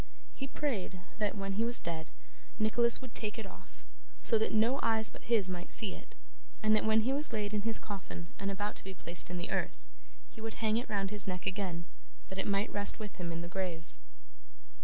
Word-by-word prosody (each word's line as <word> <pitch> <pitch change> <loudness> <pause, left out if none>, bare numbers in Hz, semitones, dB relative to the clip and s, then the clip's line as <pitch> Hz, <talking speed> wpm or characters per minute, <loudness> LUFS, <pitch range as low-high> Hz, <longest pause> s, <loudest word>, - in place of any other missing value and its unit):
He 270 - -5
prayed 235 -11 -3 0.2
that, 210 -1 0
when 195 0 -2
he 215 +4 +1
was 240 +1 +7
dead, 160 -2 -3 0.5
Nicholas 235 +3 +4
would 255 - -9
take 215 0 -4
it 225 - -5
off, - - -14 0.4
so 225 - +3
that 220 - 0
no 230 +6 +3
eyes 220 -1 +5
but - - -12
his 225 -5 +3
might 180 -1 -5
see 200 -4 +2
it, - - -13 0.5
and 215 0 +5
that 215 - +2
when 220 0 +4
he 255 +5 +1
was 290 +1 +5
laid 210 -2 -2
in 210 - +1
his 225 +1 -1
coffin 195 -4 -7
and 195 - -2
about 205 +1 -3
to - - -9
be 190 0 -8
placed 170 0 +2
in 180 - -4
the 175 - -4
earth, - - -1 0.5
he 225 - -12
would 225 0 -5
hang 220 0 +1
it 240 - -3
round 195 -2 -1
his 210 -2 +6
neck 180 -1 -3
again, 190 -3 -2 0.4
that 190 - -5
it - - -1
might 200 0 0
rest 205 0 +3
with 215 -3 -8
him 170 -2 -3
in 165 0 -4
the - - -6
grave. 175 -3 -3
205 Hz, 220 wpm, -33 LUFS, 190-220 Hz, 0.5 s, was